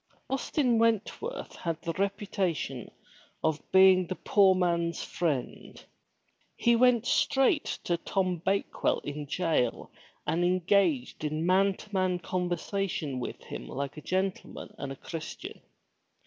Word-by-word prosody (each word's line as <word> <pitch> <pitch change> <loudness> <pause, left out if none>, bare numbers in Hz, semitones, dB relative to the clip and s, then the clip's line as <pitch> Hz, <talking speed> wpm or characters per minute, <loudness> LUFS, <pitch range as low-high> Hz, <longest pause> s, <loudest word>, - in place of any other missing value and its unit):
Austin 270 -3 +1
Wentworth 230 - -1
had 165 -2 -3
the 165 - -2
reputation 190 - -2 0.5
of 160 -1 +1
being 190 -1 +6
the 185 - -3
poor 195 -1 +4
man's 170 -2 0
friend. 150 -7 -3 0.7
He 235 0 +3
went 245 -1 +4
straight 275 +4 +2
to 175 - 0
Tom 185 +1 -1
Bake 195 +1 -1
well - - +3
in 145 0 -6
jail 155 -7 0 0.3
and 170 +2 +1
engaged 180 -7 +1
in 155 +2 -1
man 195 +2 +3
to 210 - -14
man 185 -2 +1
conversation 175 -4 -2
with 125 - -6
him - - -7
like 140 +1 -4
a 155 - -8
gentleman 190 +3 -3
and 140 - -4
a - - -5
Christian. 160 +3 -7
180 Hz, 130 wpm, -29 LUFS, 160-200 Hz, 0.7 s, being